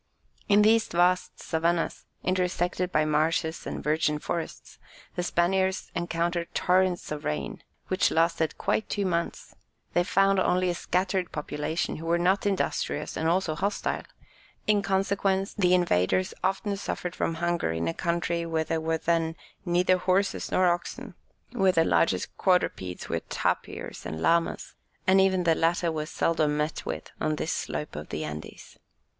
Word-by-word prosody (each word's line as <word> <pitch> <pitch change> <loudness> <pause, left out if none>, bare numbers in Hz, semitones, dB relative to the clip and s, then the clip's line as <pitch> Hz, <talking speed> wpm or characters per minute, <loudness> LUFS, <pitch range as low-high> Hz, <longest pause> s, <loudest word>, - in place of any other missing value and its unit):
In 205 +1 +6
these 220 +1 +4
vast 180 +1 +1
Savannahs, 165 +1 -1 0.2
intersected 180 0 0
by 155 -2 +2
marshes 160 +2 0
and - - -5
virgin 150 0 +1
forests, 165 +2 -5 0.3
the - - -2
Spaniards 190 +2 +1
encountered 170 0 -1
torrents 180 -2 +2
of 150 0 -4
rain, 155 +6 -3 0.3
which 185 0 +2
lasted 165 -1 +1
quite 220 - 0
two 200 -2 -1
months; 170 -2 -2 0.4
they 175 - +3
found 195 +1 +3
only 180 0 +2
a - - -1
scattered 185 +1 -1
population, 150 +2 -2
who 165 +1 -7
were 170 +1 +3
not 190 +4 +2
industrious 195 -2 -1
and 160 +1 0
also 175 -2 +1
hostile; 200 +6 -1 0.6
in 210 -1 +3
consequence, 195 0 0
the 180 -3 +3
invaders 175 - +2
often 195 +2 0
suffered 180 -2 -4
from 165 - -1
hunger 170 - 0
in 80 0 -2
a 85 - 0
country 170 0 -1
where 165 -1 0
there 160 +1 -2
were 160 0 0
then 165 0 0 0.3
neither 180 +1 +3
horses 190 +2 0
nor 185 - +3
oxen, 175 0 -2 0.4
where 195 -6 +3
the 165 -1 +3
largest - - +1
quadrupeds 95 - 0
were - - -1
tapirs - - -2
and 80 +1 -5
llamas, 165 - +1 0.3
and 190 0 +5
even 190 -1 +3
the 165 -1 +4
latter 165 +1 +1
were 155 -1 -3
seldom 155 -3 +1
met 150 +1 -2
with - - -5
on 155 0 +1
this 160 - -2
slope 150 - -4
of 75 +1 -7
the 75 - -3
Andes. 75 0 -8
175 Hz, 155 wpm, -27 LUFS, 160-185 Hz, 0.6 s, In